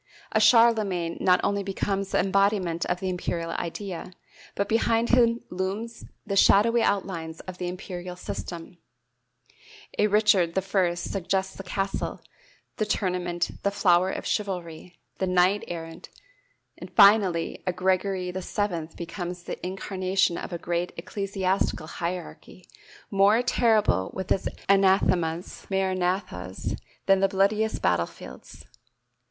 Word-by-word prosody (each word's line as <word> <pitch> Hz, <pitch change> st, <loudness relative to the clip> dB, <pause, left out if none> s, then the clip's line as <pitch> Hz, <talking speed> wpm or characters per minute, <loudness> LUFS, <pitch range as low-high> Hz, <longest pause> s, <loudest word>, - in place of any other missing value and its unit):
A -, -, +3 dB
Charlemagne 215 Hz, -8 st, +4 dB
not 180 Hz, -1 st, +4 dB
only 200 Hz, 0 st, +1 dB
becomes 195 Hz, 0 st, -2 dB
the -, -, 0 dB
embodiment 195 Hz, -3 st, +1 dB
of 180 Hz, -, -1 dB
the 190 Hz, -1 st, -2 dB
imperial 170 Hz, -2 st, -3 dB
idea, 180 Hz, +1 st, -5 dB, 0.4 s
but 200 Hz, -, -1 dB
behind 225 Hz, +1 st, +2 dB
him 235 Hz, -1 st, +4 dB
looms 195 Hz, +6 st, -4 dB, 0.2 s
the 200 Hz, -2 st, -2 dB
shadowy 230 Hz, +4 st, +5 dB
outlines 170 Hz, -6 st, -1 dB
of 185 Hz, -1 st, -9 dB
the 180 Hz, -, -2 dB
imperial 180 Hz, -1 st, -6 dB
system; 175 Hz, -1 st, -7 dB, 1.2 s
a 210 Hz, -, +5 dB
Richard 205 Hz, -5 st, +3 dB
I 190 Hz, -2 st, +1 dB
suggests 190 Hz, +1 st, -2 dB
the -, -, -7 dB
castle, 195 Hz, +1 st, -3 dB, 0.6 s
the 215 Hz, -, 0 dB
tournament, 180 Hz, -4 st, -1 dB
the 200 Hz, -, +1 dB
flower 185 Hz, -2 st, +3 dB
of -, -, -4 dB
chivalry, 180 Hz, -4 st, -4 dB, 0.2 s
the 190 Hz, -, 0 dB
knight 185 Hz, +3 st, +3 dB
errant; 165 Hz, -1 st, -7 dB, 0.9 s
finally 195 Hz, -5 st, +5 dB
a -, -, +3 dB
Gregory 185 Hz, 0 st, 0 dB
VII 185 Hz, -2 st, -2 dB
becomes 175 Hz, +1 st, -6 dB
the -, -, -7 dB
incarnation 185 Hz, -1 st, 0 dB
of -, -, -6 dB
a 170 Hz, -, -3 dB
great 175 Hz, +1 st, -2 dB
ecclesiastical 195 Hz, -4 st, -1 dB
hierarchy, 175 Hz, +2 st, -6 dB, 0.4 s
more 200 Hz, +4 st, +4 dB
terrible 220 Hz, -, +2 dB
with 190 Hz, -1 st, -5 dB
its 190 Hz, -, +1 dB, 0.2 s
anathemas 185 Hz, -4 st, +2 dB
maranathas 185 Hz, -, -2 dB, 0.3 s
than 195 Hz, 0 st, +4 dB
the 195 Hz, -, +4 dB
bloodiest 210 Hz, +3 st, +1 dB
battlefields. 85 Hz, -7 st, -3 dB
190 Hz, 120 wpm, -26 LUFS, 175-200 Hz, 1.2 s, shadowy